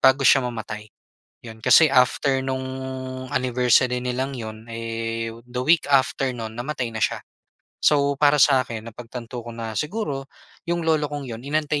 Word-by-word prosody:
bago 135 +1 +5
siya 135 - +7
mamatay. 110 -2 -6 0.6
'Yon, 110 -1 -10
kasi 160 +7 +7
after 130 +1 +3
nung 130 0 -2 0.6
anniversary 125 0 +2
nilang 130 +2 -2
'yon 110 -2 -7
eh, 115 0 -3 0.2
the 125 0 -5
week 160 +5 +4
after 135 -1 +2
nun, 110 -2 -6
namatay 125 -1 -3
na 110 - -5
siya. - - 0 0.6
So 140 -1 +3
para 145 0 +5
sa'kin, 130 -6 +3
napagtanto 120 +1 -8
ko 120 0 -9
na 115 -1 -5
siguro, 150 - -3 0.4
'yong 170 -1 0
lolo 155 -2 +2
kong 145 -1 -5
'yon, 115 -2 -6
inantay 150 +1 0
125 Hz, 155 wpm, -23 LUFS, 115-140 Hz, 0.6 s, siya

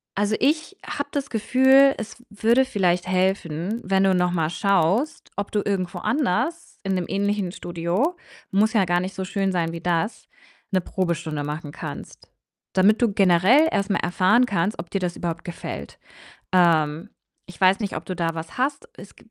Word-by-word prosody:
Also, 205 +2 +1
ich 310 +7 0
habe 295 -1 -4
das 280 -1 -2
Gefühl, 265 +4 +4
es 225 +1 -7
w 245 - -22
würde 230 +5 +2
vielleicht 180 -7 0
helfen, 185 +2 -1
wenn 190 0 +2
du 190 -1 +4
noch 180 -1 +2
mal 165 -3 0
schaust, 195 - 0
ob 200 0 -3
du 210 - +1
irgendwo 185 -3 -2
anders 285 - -1
in 195 -1 -1
'nem 180 -1 -1
ähnlichen 200 -1 -1
Studio, 175 - -2 0.3
muss 215 +4 +2
ja 205 -5 +3
gar 175 0 +1
nicht 185 +1 -5
so 190 - -3
schön 195 0 -1
sein 165 -2 0
wie 170 - -6
das, 175 +5 -1 0.4
'ne 190 -1 +2
Probestunde 170 -5 -2
machen 150 0 -5
kannst, - - -9 0.4
damit 200 +4 +4
du 235 -3 +3
generell 195 - +5
erst 200 -1 0
mal 205 - +1
erfahren 185 +8 +3
kannst, 195 -2 -1
ob 170 0 -6
dir 195 - -1
das 180 -1 -2
überhaupt 170 -1 -4
gefällt. 175 - -7 0.6
Ähm, 165 0 +2 0.4
ich 180 - -14
weiß 190 +2 +4
nicht, 205 -3 -3
ob - - -7
du 185 - -4
da 165 -1 -1
was 165 0 -7
hast. 280 +3 -1
Es 200 - -13
gibt 225 - -21
190 Hz, 185 wpm, -23 LUFS, 175-220 Hz, 0.6 s, generell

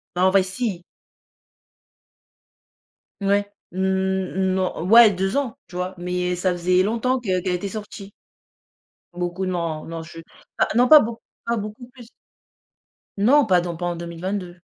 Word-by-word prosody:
En 185 +1 +4
vrai 195 -1 +4
si. 190 -2 -4 2.4
Ouais, 200 +1 +1 0.2
mmh, - - -8
mmh, 190 0 0
non, 185 -3 -2
ouais 230 0 +8
2 195 +3 -2
ans, 270 -2 -2
tu 175 - -14
vois? 180 +1 -3
Mais, 180 0 -2
ça 185 0 +1
faisait 180 +1 +2
longtemps 235 +5 0
que 190 -6 -1
qu'elle 180 0 -1
était 190 +3 -4
sortie. 205 -1 -8 1.0
Beaucoup 175 +1 -3
non, 170 -4 -3
non, 165 0 -6
je 165 0 -11 0.4
ah - - +3
non 245 +2 +5
pas 305 - +10
beau 230 -2 -3 0.3
pas 235 0 0
beaucoup 215 +4 -7
plus. 245 -2 -15 1.1
Non, 260 +7 +4
pas 180 -3 +4
dans 175 -1 -4
pas 175 +2 -5
en 175 - -2
2022. 175 +2 -5
190 Hz, 150 wpm, -22 LUFS, 180-215 Hz, 2.4 s, pas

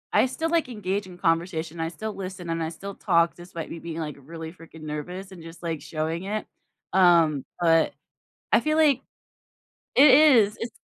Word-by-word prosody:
I - - +5
still, 320 +5 -3
like, 330 -6 +1
engage 200 -3 -3
in 180 -1 -12
conversation, 165 -1 -1
I 165 - -1
still 210 +6 -6
listen, 185 -2 -7
and 165 0 -1
I 160 - -1
still 200 +4 -8
talk 170 -3 +2
despite 175 -2 -8
me 165 - -6
being, 165 0 -6
like, 150 -3 -4
really 160 +3 -8
freaking 165 -2 -14
nervous 180 +6 -6
and 175 -3 -11
just, 165 +2 -12
like, 165 -3 -3
showing 160 +3 -3
it, 210 +2 -3 0.5
um, 170 -6 +4 0.2
but 165 -2 +3 0.6
I - - +6
feel 310 +1 0
like 295 -5 +4 0.9
It 275 +2 +8
is, 255 -9 +6
it's 230 0 -4
175 Hz, 185 wpm, -25 LUFS, 165-205 Hz, 0.9 s, It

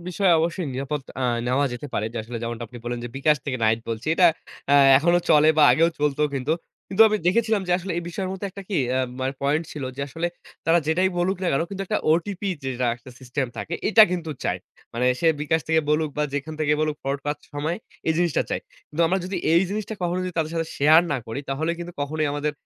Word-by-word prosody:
বিষয়ে 185 0 +2
অবশ্যই 170 +1 -1
নিরাপদ 140 +2 -3 0.2
আ - - 0 0.2
নেওয়া 130 +3 +2
যেতে 120 +4 -6
পারে। 105 - 0
যে - - -8
আসলে 115 +2 -6
যেমনটা 115 0 -4
আপনি 120 - -10
বললেন, 120 0 -3
যে - - -4
bKash 150 +2 +2
থেকে 130 -2 -2
নাহিদ 110 +1 +3
বলছি। 115 +2 -4
এটা 180 +1 +6 0.5
আ - - +7 0.2
এখনো 170 +4 +3
চলে 155 0 +6
বা - - +7
আগেও 165 +1 +4
চলত 145 -1 0 0.2
কিন্তু। 135 +3 -1 0.4
কিন্তু 195 - +5
আমি 215 - +1
দেখেছিলাম 220 +2 +2
যে 175 - +3
আসলে 185 +1 -4
এই - - -3
বিষয়ের 185 +2 -4
মধ্যে 190 +1 -4
একটা 200 +1 -9
কি 200 - -1 0.2
আ - - +2 0.2
মানে 130 +1 -1
পয়েন্ট 150 +4 +1
ছিল 145 -3 -5
যে - - -5
আসলে 165 +5 -2 0.4
তারা 165 +1 +5
যেটাই 175 +4 +2
বলুক 185 +3 +1
না - - 0
কেনো 140 +4 +1
কিন্তু 195 0 -4
একটা - - 0
ওটিপি 190 +4 -1 0.2
যেটা 125 -1 -1
একটা 125 +1 -14
সিস্টেম 130 +1 -2
থাকে 170 - -4
এটা 220 +1 +8
কিন্তু 170 -3 -3
চায়। - - 0 0.4
মানে 125 +2 +1
সে 170 - +1
bKash 155 +2 0
থেকে 160 0 +4
বলুক 155 0 +1
বা 150 - +1
যেখান 150 +2 -3
থেকে 150 -1 +2
বলুক 155 -1 0
ফ্রড 135 +1 -1
করার 145 0 -2 0.2
সময় 155 +4 -1 0.3
এই - - +4
জিনিসটা 175 -3 +2
চায়। - - -1 0.3
কিন্তু 165 +3 0
আমরা 190 +3 +1
যদি 185 +1 -3 0.2
এই 170 - +5
জিনিসটা 215 +1 -3
কখনোই 175 +1 0
যদি 185 - -4
তাদের 155 -1 0
সাথে 165 -1 -1
শেয়ার 155 +4 +6
না - - +1
করি 115 +5 -4
তাহলে 155 +5 -1
কিন্তু 175 0 -6
কখনোই 155 +2 -1
আমাদের 145 +1 -1
155 Hz, 230 wpm, -24 LUFS, 140-175 Hz, 0.5 s, এটা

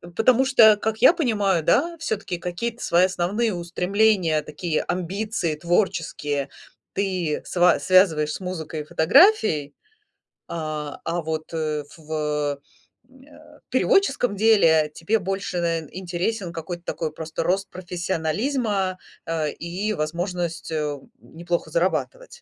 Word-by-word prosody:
Потому 255 +3 +4
что, 220 -5 +6
как 220 +1 -2
я - - +7
понимаю, 205 - +1
да, 335 - +2
всё-таки 205 - -3
какие-то 225 +8 -4
свои 175 +2 +4
основные 190 +4 -1
устремления, 180 -1 +1
такие 155 +1 -2
амбиции 185 -1 -2
творческие 155 -5 -1 0.4
ты 185 -6 -1
сва 175 -3 +3
связываешь 160 -2 +4
с - - -5
музыкой 165 -4 -5
и - - -6
фотографией, 160 - +4 0.7
а, 155 -3 -5
а 170 +1 -2
вот, 160 +1 -5
э, 155 -2 -2
в 160 0 -14
э, 150 -2 -1 0.5
м, 260 0 -19
э 295 - -18
переводческом 275 - +2
деле 165 -8 +4
тебе 210 +7 0
больше, 195 -1 -3
навер 165 -3 -1
интересен 185 +1 -3
какой-то 170 +1 -6
такой 160 -2 -3
просто 160 0 -4
рост 195 +2 0
профессионализма, 185 - -2 0.3
а, 165 -2 -1
и 180 +8 -3
возможность, 170 +1 -3
э, 150 -2 -2 0.2
неплохо 170 0 -4
зарабатывать. 190 - -1
175 Hz, 125 wpm, -23 LUFS, 160-205 Hz, 0.7 s, я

